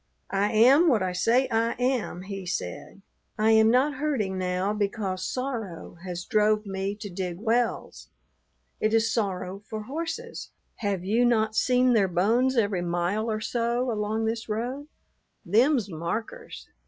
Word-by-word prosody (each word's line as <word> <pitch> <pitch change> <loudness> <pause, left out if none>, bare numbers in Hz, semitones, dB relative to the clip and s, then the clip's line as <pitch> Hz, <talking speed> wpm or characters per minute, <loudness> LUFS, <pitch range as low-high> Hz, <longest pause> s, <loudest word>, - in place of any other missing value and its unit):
"I 200 +1 +1
am 265 +10 +6
what 230 - +3
I 185 - -1
say 235 +8 +2
I 230 +1 +1
am," 250 -7 -1
he 195 0 -6
said. 180 - -5 0.3
"I 220 +1 +3
am 220 0 +6
not 260 +4 +2
herding 260 -10 -1
now 185 +2 -1
because 200 -3 -2
sorrow 230 -11 -5
has 175 -2 -5
drove 215 -1 +2
me 195 +1 -3
to 210 - -5
dig 180 -2 -4
wells. 230 +2 -1 0.7
It 215 +1 +2
is 225 0 +2
sorrow 195 -3 -2
for 215 -1 -5
horses. 330 - -5 0.3
Have 200 -4 -2
you 225 +5 +2
not 220 -3 +2
seen 250 +2 +3
their 205 -4 +4
bones 230 +9 +2
every 205 -5 +1
mile 175 +6 -1
or 215 -1 -2
so 235 +2 -1
along 215 +1 -1
this 225 0 -3
road? 250 +7 -3 0.6
Them's 235 - +3
markers. 215 - -5
215 Hz, 150 wpm, -26 LUFS, 195-245 Hz, 0.7 s, am